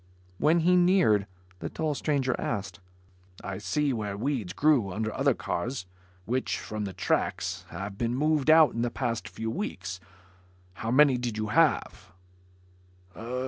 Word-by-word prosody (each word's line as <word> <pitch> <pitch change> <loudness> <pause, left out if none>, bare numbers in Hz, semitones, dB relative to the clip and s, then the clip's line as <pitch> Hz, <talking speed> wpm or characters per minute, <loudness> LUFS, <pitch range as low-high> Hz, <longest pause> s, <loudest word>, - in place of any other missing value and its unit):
When 165 +3 +4
he 180 +2 +4
neared, 175 - +4 0.3
the - - -4
tall 155 -2 -2
stranger 140 -3 0
asked, 95 -5 -3 0.6
"I 95 -1 -5
see 150 -3 0
where 105 -3 -3
weeds 120 -5 -2
grew 135 -6 +2
under 110 +3 -3
other - - +2
cars 120 +3 -3 0.4
which, 130 +3 -1
from 105 -1 -5
the 95 - -5
tracks, 90 - -1
have 100 0 -7
been 120 0 0
moved 150 +1 +1
out 160 -1 +7
in 115 - -2
the 120 - +1
past 120 -2 -3
few 110 0 -4
weeks. 95 - -4 0.7
How 110 - -5
many 135 0 +5
did 120 -3 -3
you 110 0 -2
have?" 155 - +1
120 Hz, 145 wpm, -28 LUFS, 105-150 Hz, 0.7 s, out